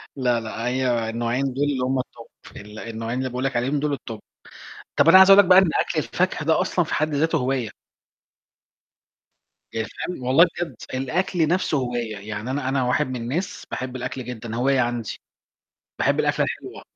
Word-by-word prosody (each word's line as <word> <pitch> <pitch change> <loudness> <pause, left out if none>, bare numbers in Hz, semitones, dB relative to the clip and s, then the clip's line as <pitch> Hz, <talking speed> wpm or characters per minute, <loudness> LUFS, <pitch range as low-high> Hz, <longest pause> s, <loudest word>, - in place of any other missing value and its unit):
لا، 125 -3 +1
لأ، 115 +1 -5
هي 125 -3 0
النوعين 120 +3 -1
دُول 140 +2 -1
اللي 140 -3 0
هم 130 +1 0
الTop، 120 -2 -7 0.3
ال 105 +1 -10
النوعين 115 +2 -4
اللي 130 0 -2
باقول 125 +2 -4
لك 135 -1 -1
عليهم 135 +5 0
دُول 145 -1 -1
الTop. 115 -4 -8 0.8
طَب 145 - +4
أنا 185 +3 +9
عايز 190 +1 +8
أقول 195 - +9
لك 205 - +8
بقى 185 - +8
إن 190 -4 +5
أكل 160 - -2
الفاكهة 155 +6 -1
ده 160 +3 +3
أصلًا 185 -2 +1
في - - -4
حد 155 0 0
ذاتُه 160 +2 +1
هواية. 125 -4 -1 2.0
يعني 110 -1 -2
فاهم؟ 180 -8 -6
والله 135 +8 +6
بجد 175 - -3 0.2
الأكل 160 +6 0
نَفْسُه 175 -3 +1
هواية، 120 -4 -3
يعني 105 +4 -5
أنا 135 -2 -2
أنا 135 -1 +1
واحد 145 +3 +1
من 130 - -5
الناس 130 +11 -4
باحب 130 0 -4
الأكل 125 0 -5
جدًا، 115 -2 -6
هواية 135 +2 +2
عندي، 120 -3 -2 0.8
باحب - - +2
الأكلة - - +1
الحلوة، - - -7
130 Hz, 185 wpm, -23 LUFS, 120-150 Hz, 2.0 s, أنا